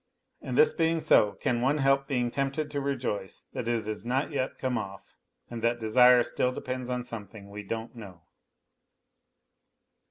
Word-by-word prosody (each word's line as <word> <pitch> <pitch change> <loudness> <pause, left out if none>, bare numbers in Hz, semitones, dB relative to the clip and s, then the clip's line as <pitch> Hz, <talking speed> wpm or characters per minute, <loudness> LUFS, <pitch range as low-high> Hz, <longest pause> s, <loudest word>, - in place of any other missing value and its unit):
And - - -4
this 460 - +6
being 165 -1 +1
so, 105 -9 +4
can 120 +4 -1
one 135 +4 +2
help 135 -1 +2
being 125 -4 0
tempted 140 +3 -2
to 145 - -2
rejoice 125 -9 -3
that - - -4
it 115 -2 0
has 110 -1 -4
not 130 +6 -1
yet 135 -2 -2
come 130 -1 -1
off, 100 -5 -6 0.3
and 120 -1 -7
that 120 +1 +1
desire 125 +2 +6
still 125 - 0
depends 130 0 -5
on 125 0 -2
something 105 -4 -9
we 105 +1 -6
don't 115 +4 -5
know 95 -7 -11
125 Hz, 165 wpm, -28 LUFS, 110-135 Hz, 0.3 s, this